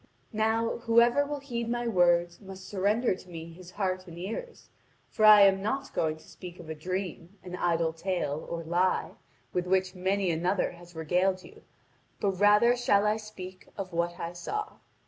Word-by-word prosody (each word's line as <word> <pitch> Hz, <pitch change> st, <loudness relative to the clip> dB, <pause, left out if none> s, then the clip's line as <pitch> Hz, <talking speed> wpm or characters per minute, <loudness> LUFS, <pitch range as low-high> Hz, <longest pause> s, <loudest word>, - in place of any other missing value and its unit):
Now, 220 Hz, +1 st, +1 dB
whoever 235 Hz, +5 st, +4 dB
will 290 Hz, -1 st, -4 dB
heed 235 Hz, -4 st, -4 dB
my 240 Hz, 0 st, -1 dB
words, 175 Hz, -3 st, +2 dB
must 190 Hz, -1 st, -10 dB
surrender 205 Hz, +4 st, +1 dB
to 185 Hz, 0 st, -12 dB
me 165 Hz, -1 st, -8 dB
his 180 Hz, +1 st, -12 dB
heart 185 Hz, -1 st, -2 dB
and 170 Hz, -1 st, -10 dB
ears, 225 Hz, -, -6 dB, 0.4 s
for 215 Hz, -, +2 dB
I 210 Hz, -1 st, +10 dB
am 195 Hz, -1 st, +5 dB
not 265 Hz, +7 st, -3 dB
going 155 Hz, -1 st, 0 dB
to 160 Hz, -, -18 dB
speak 180 Hz, -1 st, -11 dB
of 170 Hz, -, -10 dB
a -, -, -2 dB
dream, 180 Hz, +2 st, -5 dB
an 180 Hz, -1 st, -6 dB
idle 165 Hz, -2 st, +1 dB
tale, 165 Hz, -3 st, -3 dB
or 170 Hz, -1 st, -4 dB
lie, 175 Hz, +3 st, +1 dB, 0.4 s
with 180 Hz, 0 st, -1 dB
which 185 Hz, 0 st, +1 dB
many 190 Hz, 0 st, 0 dB
another 175 Hz, +4 st, 0 dB
has 175 Hz, 0 st, -15 dB
regaled 180 Hz, +4 st, 0 dB
you, -, -, -15 dB, 0.6 s
but 200 Hz, -, +1 dB
rather 210 Hz, +4 st, +5 dB
shall 210 Hz, -4 st, +2 dB
I 210 Hz, +1 st, +2 dB
speak 185 Hz, -4 st, -10 dB
of 190 Hz, -3 st, -5 dB
what 170 Hz, +1 st, -1 dB
I 170 Hz, +1 st, -4 dB
saw." 425 Hz, -, -5 dB
185 Hz, 180 wpm, -29 LUFS, 175-215 Hz, 0.6 s, I